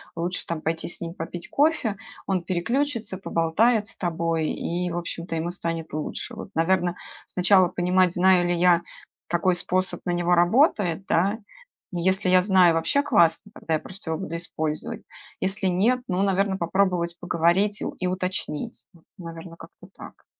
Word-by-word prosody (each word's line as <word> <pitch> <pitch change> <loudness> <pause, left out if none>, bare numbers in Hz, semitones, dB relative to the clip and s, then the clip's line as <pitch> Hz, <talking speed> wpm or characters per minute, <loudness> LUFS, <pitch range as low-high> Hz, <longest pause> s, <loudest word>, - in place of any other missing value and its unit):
лучше 175 +2 -2
там 165 -2 -4
пойти 160 0 -2
с 170 - +1
ним 170 +1 -6
попить 170 +1 -6
кофе, 280 -9 +1 0.3
он 185 -3 0
переключится, 230 +4 -1
поболтает 205 +6 +1
с - - -4
тобой, 165 -2 -1
и 175 +1 -2
в 175 - -3
общем-то 170 0 -4
ему 165 +2 -2
станет 165 -3 -4
лучше. 155 +9 -4
Вот, 215 - -8
наверно, 175 +1 +1 0.3
сначала 185 0 +4
понимать, 180 0 +2
знаю 180 -1 +4
ли 175 - +1
я, 175 0 +4 0.5
какой 175 +2 +1
способ 185 +1 -1
на 175 - 0
него 175 0 +2
работает, 190 - +3
да. 200 +7 +1 0.5
И 175 - -2
если 190 +1 +2
я 185 0 +6
знаю, 185 -3 +5
вообще 280 - +2
классно, 205 - +2
тогда 160 - -4
я - - -1
просто 185 -3 -7
его 160 - -2
буду 170 -3 -5
использовать. 155 -2 -3 0.4
Если 195 +1 -1
нет, 220 +8 +2
ну, 185 +1 -1
наверно, 195 0 +1
попробовать 175 -1 0
поговорить 175 +4 +1
и - - -2
у - - -3
и 185 - -5
уточнить. 185 +1 -3
Вот, 165 - -22
наверно, 165 -1 -9
как-то 170 +2 -14
так. - - -13
180 Hz, 170 wpm, -24 LUFS, 170-195 Hz, 0.5 s, я